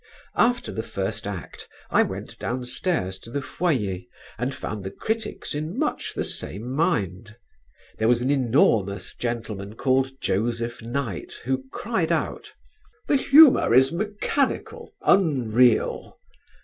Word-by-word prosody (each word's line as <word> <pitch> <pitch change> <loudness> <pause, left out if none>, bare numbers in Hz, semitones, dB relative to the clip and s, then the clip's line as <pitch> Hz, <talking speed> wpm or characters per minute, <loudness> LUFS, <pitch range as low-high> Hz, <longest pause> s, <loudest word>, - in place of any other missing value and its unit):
After 245 +1 +2
the 110 - -3
first 100 0 -4
act 100 -4 -7 0.2
I - - +5
went - - -4
downstairs 125 - -2
to 115 - -13
the 140 - -2
foyer 125 - -1 0.4
and 125 +3 -1
found 105 -2 -5
the 95 - -4
critics 220 - -4
in 155 +7 -4
much 300 - -2
the - - -1
same 105 - -5
mind. 110 - -1 0.6
There 110 - +2
was 120 0 +4
an 130 - +1
enormous 110 -7 +2
gentleman 110 -4 -4
called 135 +1 +1
Joseph 115 +4 -1
Knight, 120 -4 -4
who 130 +1 -1
cried 200 -7 -1
out: - - -2 0.5
"The - - +2
humour 275 - +7
is 130 +1 +6
mechanical, 210 +9 -2
unreal." 125 - +3
125 Hz, 125 wpm, -24 LUFS, 110-160 Hz, 0.6 s, humour